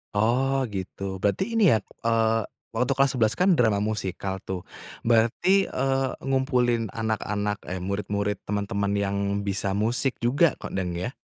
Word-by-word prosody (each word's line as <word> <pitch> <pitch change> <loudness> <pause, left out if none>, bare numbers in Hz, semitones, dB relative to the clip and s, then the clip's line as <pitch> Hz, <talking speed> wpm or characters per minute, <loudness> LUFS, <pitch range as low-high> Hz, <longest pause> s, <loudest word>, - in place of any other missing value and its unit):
Oh, 130 +5 +2
gitu. 95 0 -5
Berarti 190 - 0
ini, 215 -6 +5
ya, 110 - +5 0.2
eee, 115 -1 +2 0.3
waktu 125 +2 +1
kelas 135 -1 +3
11 110 -3 +2
kan, 185 0 +4
drama 110 -8 +3
musikal, 95 -2 -3
tuh, 90 -2 -5 0.4
berarti, 120 - +3
eee, 135 0 0 0.2
ngumpulin 125 -4 +1
anak-anak, 105 -2 -2
eh, 95 - -3
murid-murid, 100 +2 -2
teman-teman 100 0 -2
yang 100 0 0 0.3
bisa 100 0 -1
musik 120 +5 0
juga, 140 +7 +2
kok, - - -8
dang 90 -2 -2
ya? 120 +9 -3
110 Hz, 145 wpm, -26 LUFS, 100-130 Hz, 0.4 s, ini